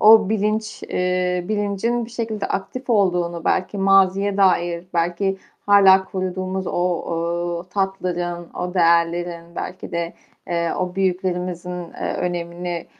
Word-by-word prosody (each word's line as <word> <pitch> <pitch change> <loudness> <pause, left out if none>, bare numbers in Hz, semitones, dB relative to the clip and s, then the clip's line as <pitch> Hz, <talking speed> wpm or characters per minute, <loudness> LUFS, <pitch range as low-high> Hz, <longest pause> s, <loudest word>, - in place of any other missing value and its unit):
o 215 -2 +8
bilinç 215 0 -1
eee, 180 0 0
bilincin 215 +3 0
bir 230 - -11
şekilde 225 -3 -3
aktif 250 +6 -4
olduğunu 175 -5 +1
belki 190 +2 0
maziye 195 +1 +4
dair, 175 -3 +2
belki 175 +3 0 0.3
hâlâ 195 -2 +7
koruduğumuz 185 0 -3
o, 170 -1 -1
eee, 180 - -24
tatların, 175 -3 -2
o 180 +1 -4
değerlerin, 170 0 +1
belki 185 0 -6
de, 170 0 -2 0.3
eee, 170 -1 0
o 180 0 -2
büyüklerimizin, 180 -1 -1 0.2
eee, - - -3
önemini 175 0 -3
180 Hz, 120 wpm, -22 LUFS, 175-195 Hz, 0.3 s, o